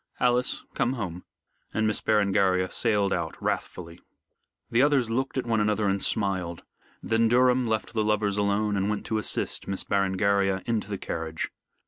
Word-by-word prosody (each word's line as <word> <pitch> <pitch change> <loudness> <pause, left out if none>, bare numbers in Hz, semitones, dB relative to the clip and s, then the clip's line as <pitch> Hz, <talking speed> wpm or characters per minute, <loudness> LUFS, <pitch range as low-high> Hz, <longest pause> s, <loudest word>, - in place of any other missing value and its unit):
Alice, 125 0 +1
come 120 - 0
home," 90 -8 -5 0.5
and 110 - +1
Miss 105 -1 0
Berengaria 95 -3 +2
sailed 105 -4 +2
out 85 -2 -3
wrathfully. 85 -1 -4 0.7
The 115 - +4
others 135 -5 +3
looked 135 +3 -1
at 130 - -1
one 115 -2 +1
another 105 0 +1
and 100 0 +1
smiled. 95 -5 -1 0.4
Then 115 0 +2
Durham 125 +1 +4
left 110 0 -2
the 110 -2 +1
lovers 105 -1 +1
alone 105 +1 +1
and 100 +1 0
went 105 - -2
to 110 - -1
assist - - -2
Miss 95 -1 -2
Berengaria 95 0 +1
into 110 -3 -1
the 100 - -3
carriage. 80 -3 -4
105 Hz, 160 wpm, -26 LUFS, 95-115 Hz, 0.7 s, The